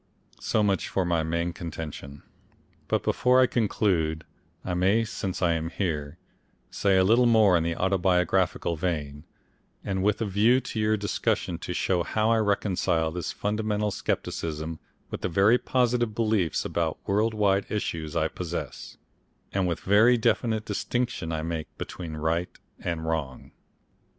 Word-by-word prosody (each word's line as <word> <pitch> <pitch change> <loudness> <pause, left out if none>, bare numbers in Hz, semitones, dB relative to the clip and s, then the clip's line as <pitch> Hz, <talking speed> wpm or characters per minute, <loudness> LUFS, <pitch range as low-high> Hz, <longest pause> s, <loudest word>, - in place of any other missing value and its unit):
So 110 - +1
much 100 -2 0
for 95 - 0
my 85 -2 +1
main 85 +2 -1
contention. 80 -6 -7 0.6
But - - 0
before 125 +1 +3
I 130 - +7
conclude 90 -9 0 0.4
I 90 - -2
may 95 +6 +3
since 95 -4 -4
I 85 -1 +3
am 80 0 -2
here 80 -4 -3 0.5
say 100 -2 +2
a 95 - +5
little 115 +5 +4
more 110 -5 +5
in 85 - +3
the 85 0 -1
autobiographical 90 -2 +1
vein, 75 -3 -3 0.6
and 95 -1 -2
with 105 +2 +1
a 115 - 0
view 105 +6 +3
to 130 -3 -5
your 110 0 +2
discussion 95 -4 -1
to 90 - -5
show 90 -2 +1
how 110 +5 +1
I 115 - +4
reconcile 95 -6 +1
this 90 +1 -4
fundamental 105 0 -1
scepticism 80 -3 -3 0.3
with - - -5
the - - -1
very 100 +8 +4
positive 120 -3 +1
beliefs 110 -8 +1
about - - -1
world 110 +3 +1
wide 100 -2 +2
issues 85 -6 -3
I 80 -1 +2
possess, 85 +1 -6 0.6
and 95 -2 +1
the 85 - 0
very 110 +8 +4
definite 110 -1 +1
distinction 120 -4 -2
I 80 -1 -2
make 80 -1 -3
between 85 -4 -6
right 80 +3 0 0.3
and 85 -2 -3
wrong. 80 -5 -3
95 Hz, 150 wpm, -26 LUFS, 80-105 Hz, 0.6 s, I